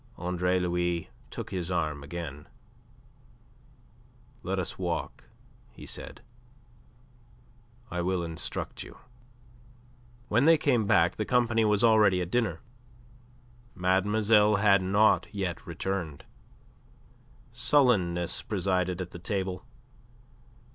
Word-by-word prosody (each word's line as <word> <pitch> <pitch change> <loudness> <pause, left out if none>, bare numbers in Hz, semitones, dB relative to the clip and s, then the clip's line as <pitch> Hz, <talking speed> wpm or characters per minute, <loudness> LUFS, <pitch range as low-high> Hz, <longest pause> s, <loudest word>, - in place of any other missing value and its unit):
Andre 90 +1 0
Louis 85 -1 -1 0.2
took - - -7
his 90 -2 -3
arm 80 -5 -1
again. 75 -2 -7 1.9
"Let 95 +2 -3
us 95 0 -4
walk," 85 -3 -4 0.4
he - - -13
said. - - -7 1.7
"I 90 - -2
will 90 0 -1
instruct 80 -1 -4
you." - - -10 1.3
When 120 +5 +2
they 165 0 +7
came 125 -8 +1
back 85 -2 +3
the 105 - 0
company 115 -2 +2
was 105 0 +2
already 105 -5 +5
at 90 0 -4
dinner. 120 -4 0 1.1
Mademoiselle 105 +3 +3
had 100 -1 +4
not 100 +4 +3
yet 95 -5 -4
returned. 85 -3 -4 1.3
Sullenness 120 - +2
presided 95 -3 -1
at 90 -1 -6
the 90 - -9
table. 95 0 -3
95 Hz, 100 wpm, -28 LUFS, 85-105 Hz, 1.9 s, they